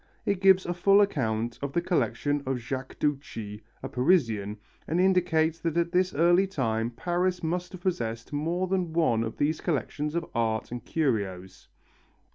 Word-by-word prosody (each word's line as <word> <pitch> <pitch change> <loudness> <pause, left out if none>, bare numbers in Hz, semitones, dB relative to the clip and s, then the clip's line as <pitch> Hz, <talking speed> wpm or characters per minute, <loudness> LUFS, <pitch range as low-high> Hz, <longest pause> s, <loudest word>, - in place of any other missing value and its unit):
It 200 -2 0
gives 190 -1 +5
a 175 - -1
full 195 +3 +4
account 120 - 0
of 140 -1 -4
the - - +2
collection 145 -4 0
of 135 -1 0
Jacques 130 +2 -5
Duchie, 115 -8 -3 0.2
a - - -2
Parisian, 115 - +1 0.3
and 165 +3 0
indicates 175 -4 +2
that 165 -1 -2
at 170 0 +1
this 185 +1 +2
early 175 +5 +4
time 115 - -1
Paris 175 +7 -1
must 175 +2 -2
have 185 - -9
possessed 115 -10 -3
more 165 +5 0
than 180 -3 -1
one 155 -9 +2
of 110 - -5
these 155 +2 0
collections 150 -1 -2
of 170 -1 -1
art 110 -2 -1
and 120 0 -5
curios. 95 - -2
155 Hz, 165 wpm, -27 LUFS, 115-175 Hz, 0.3 s, gives